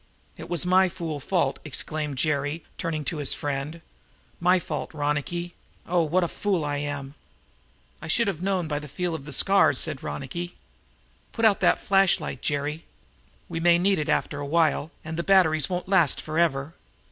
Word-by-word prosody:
"It - - -10
was 175 0 +1
my 185 +1 +5
fool 165 -4 -5
fault," 175 +5 0
exclaimed 150 0 -3
Jerry, 145 +2 -1 0.2
turning 155 -4 -2
to 160 - -2
his 145 -2 +1
friend. 145 +3 -4 0.6
"My 180 +2 +4
fault, 180 - -4
Ronicky! 150 +4 -2 0.3
Oh, 175 0 +2
what 170 +3 +2
a - - +1
fool 185 -3 -1
I 145 0 -1
am!" 145 -1 -4 0.9
"I - - -7
should 230 +8 +2
have 180 -5 -2
known 185 -3 0
by 145 -1 -1
the 150 - -9
feel 175 +5 -3
of 150 -4 -6
the 150 - -7
scars," 195 +7 +4
said 150 -4 -2
Ronicky. 170 +6 -5 0.8
"Put 230 - +1
out 210 -3 +5
that - - +4
flash 195 -1 +3
light, - - -6
Jerry. 150 +2 -2 0.6
We 165 - -4
may 170 0 +5
need 190 +1 +2
that 150 0 -2
after 145 -1 0
a 145 - -4
while, 160 -1 +2 0.2
and 160 +1 -5
the 170 - -1
batteries 160 -7 +4
won't 180 -1 -3
last 185 -7 +3
forever." 155 -2 0
160 Hz, 180 wpm, -26 LUFS, 145-180 Hz, 0.9 s, my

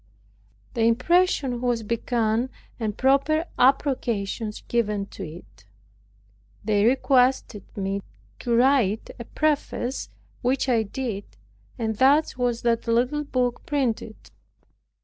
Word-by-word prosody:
The 230 - -2
impression 255 +2 +2
was 240 -2 0
begun, 230 +1 0 0.3
and 215 -2 -3
proper 280 +5 +2
approbations 235 -6 +1
given 210 -4 0
to 195 - -7
it. 155 - -11 1.0
They 210 -1 +2
requested 255 -4 +2 0.2
me 195 0 -2 0.4
to 235 - 0
write 240 -4 +2
a 235 - -6
preface, 290 -4 -1 0.3
which 260 +2 +1
I 240 -3 +3
did, 215 -1 -4 0.5
and 220 -2 -2
thus 285 +5 +4
was 245 -2 -1
that 235 -1 +1
little 250 +6 +1
book 250 -3 -1
printed. 245 -6 -1
240 Hz, 110 wpm, -24 LUFS, 220-265 Hz, 1.0 s, thus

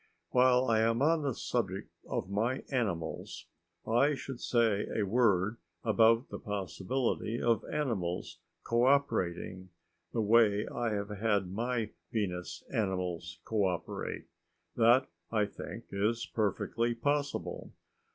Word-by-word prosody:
While 125 0 +5
I 115 -3 +3
am 115 +1 +2
on 160 +1 +3
the 140 -5 -1
subject - - -2 0.2
of - - -2
my 115 +7 0
animals, 90 -11 -2 0.4
I 140 +6 +3
should 135 -2 -7
say 115 -4 +2
a 110 - +2
word 105 -1 +2 0.3
about 115 +2 +4
the - - -6
possibility 105 +4 -2
of 115 -2 +2
animals 100 -12 -2 0.2
cooperating 115 -8 +1 0.4
the 115 - 0
way 105 -1 +4
I 120 -2 -2
have 100 0 -2
had 105 -3 0
my 115 0 -1 0.2
Venus 90 -5 -3
animals 90 -6 -2
cooperate. 95 -6 -2 0.5
That, 120 +3 +5 0.2
I 105 -2 +2
think, 115 +3 -8
is 110 +4 0
perfectly 115 +2 0
possible. 145 +3 -2
110 Hz, 115 wpm, -32 LUFS, 100-120 Hz, 0.5 s, While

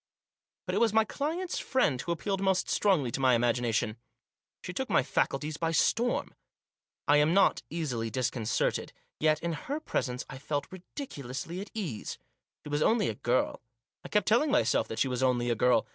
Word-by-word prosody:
But - - -3
it - - +2
was 230 -2 +3
my 220 0 +4
client's 325 +9 -2
friend 150 - +1
who 170 - -3
appealed 195 +3 -2
most 190 -1 +2
strongly 170 - +2
to - - -3
my 130 -2 +4
imagination. 115 -2 +1 0.7
She - - -5
took - - -3
my - - +4
faculties 150 +2 -1
by 165 0 0
storm. 235 +8 +1 0.7
I 145 - +6
am 150 +4 +3
not 195 - +4
easily 130 -9 -2
disconcerted. 115 -1 -1 0.3
Yet, 155 +1 +2
in 170 -1 -1
her 280 - -4
presence, 125 - -2
I 130 - -9
felt 145 +1 -2
ridiculously 170 - -7
ill - - -3
at 205 - -9
ease. 165 - -4 0.5
She - - -6
was 145 +1 0
only 220 +3 +3
a - - -2
girl. 120 +4 0 0.4
I - - -8
kept 210 -3 +1
telling 240 +8 +4
myself 295 +2 +2
that 110 - -6
she - - +2
was 125 -1 -2
only 120 -2 +2
a - - +2
girl. 125 0 +3
150 Hz, 185 wpm, -30 LUFS, 125-200 Hz, 0.7 s, I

